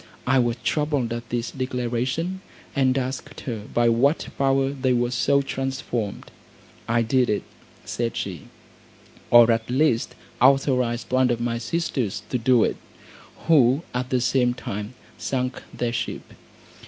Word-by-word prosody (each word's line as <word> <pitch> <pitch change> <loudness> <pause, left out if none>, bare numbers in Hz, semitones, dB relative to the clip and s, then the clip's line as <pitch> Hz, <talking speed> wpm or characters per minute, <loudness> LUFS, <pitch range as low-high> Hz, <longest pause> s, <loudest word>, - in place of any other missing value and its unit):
I 130 +1 +3
was 120 -1 +1
troubled 145 -6 0
at 120 0 -6
this 120 0 -2
declaration, 130 +8 -2 0.3
and 130 -1 +2
asked 130 +2 -4
her 110 -5 -5
by 120 0 +3
what 130 +7 +2
power 135 0 +2
they 130 -2 0
were 120 0 +1
so 140 +2 +2
transformed. 135 -6 -4 0.6
"I 115 0 +2
did 125 +2 +2
it," 105 - 0 0.4
said 115 -1 -2
she, 90 -7 -5 0.8
"or 120 -1 +8
at 115 0 -1
least 130 -2 +1 0.3
authorised 125 -3 +3
one 130 0 +3
of 120 -1 0
my 120 0 -1
sisters 120 - -2
to 125 - 0
do 120 -1 +4
it, - - 0 0.7
who 140 -2 +4
at 125 +1 -2
the 130 -1 +1
same 125 -1 +2
time 105 +1 -6 0.2
sunk 130 -1 -2
their 120 -1 -2
ship. - - -4
125 Hz, 140 wpm, -24 LUFS, 120-135 Hz, 0.8 s, or